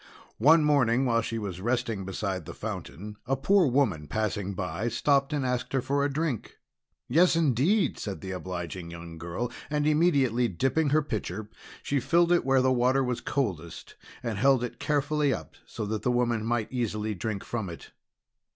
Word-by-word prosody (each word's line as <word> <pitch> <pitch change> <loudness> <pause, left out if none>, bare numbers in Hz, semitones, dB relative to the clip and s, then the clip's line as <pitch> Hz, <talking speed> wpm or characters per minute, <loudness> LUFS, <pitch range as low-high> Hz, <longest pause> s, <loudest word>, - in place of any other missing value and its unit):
One 155 +7 +6
morning, 135 -4 +3
while 115 -2 +2
she 115 0 -3
was 95 -4 -5
resting 115 -3 -1
beside 95 -2 -3
the 85 - -8
fountain, 105 -1 -6
a 135 - +2
poor 185 +6 +3
woman 115 - +1
passing 105 -1 -2
by, 90 +3 -3
stopped 140 +4 +2
and 145 -3 -1
asked 125 0 -2
her 135 - +3
for 140 +2 0
a 145 - 0
drink. 145 -5 -2 0.5
"Yes, 170 +7 +4
indeed!" 160 - +2
said 100 -3 -5
the 95 - -5
obliging 90 -2 -5
young 85 -1 -9
girl. 85 +9 -4 0.2
And 150 -1 0
immediately 140 -7 +3
dipping 135 - +1
her 155 +2 +3
pitcher, 110 -4 -4 0.3
she 140 - 0
filled 170 +6 +3
it 175 - +4
where 135 -1 +3
the 130 - +3
water 130 +2 +3
was 125 -2 -2
coldest, 90 - -3 0.3
and 115 -4 -3
held 135 0 +4
it 125 - -5
carefully 145 -1 +1
up - - -10
so 110 - -5
that 105 +1 -2
the 125 - 0
woman 120 -2 +1
might 115 -1 -1
easily 110 -4 -2
drink 100 +1 -4
from 110 -6 -4
it. 85 - -10
120 Hz, 180 wpm, -28 LUFS, 100-140 Hz, 0.5 s, One